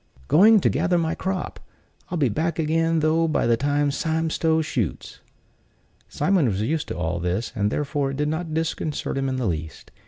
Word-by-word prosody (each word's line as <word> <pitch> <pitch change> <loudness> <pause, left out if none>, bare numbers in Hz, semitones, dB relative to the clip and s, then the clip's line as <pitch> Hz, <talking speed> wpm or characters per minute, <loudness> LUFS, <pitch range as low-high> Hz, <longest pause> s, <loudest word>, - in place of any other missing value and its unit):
"Going 210 +6 +6
to - - +3
gather 175 - +1
in 170 - +2
my 160 - -1
crop; 190 -1 -4 0.5
I'll 180 - -2
be 145 -4 +2
back 160 +9 -1
again 165 0 +1
though 160 +2 +2
by 155 - 0
the 115 0 +4
time 145 +3 +1
Sime 160 +2 -1
Stow 160 0 +1
shoots." 115 - -3 0.9
Simon 170 -2 +2
was 100 -4 -1
used 155 +6 -1
to - - -5
all 85 0 -2
this, 90 +6 -2
and 105 -2 +1
therefore 145 +1 -1
it 135 - -5
did 150 0 0
not 160 +2 -3
disconcert 155 -1 -2
him 135 0 -1
in 130 - -2
the 130 -2 -2
least. 80 -4 -4
150 Hz, 195 wpm, -23 LUFS, 125-165 Hz, 0.9 s, Going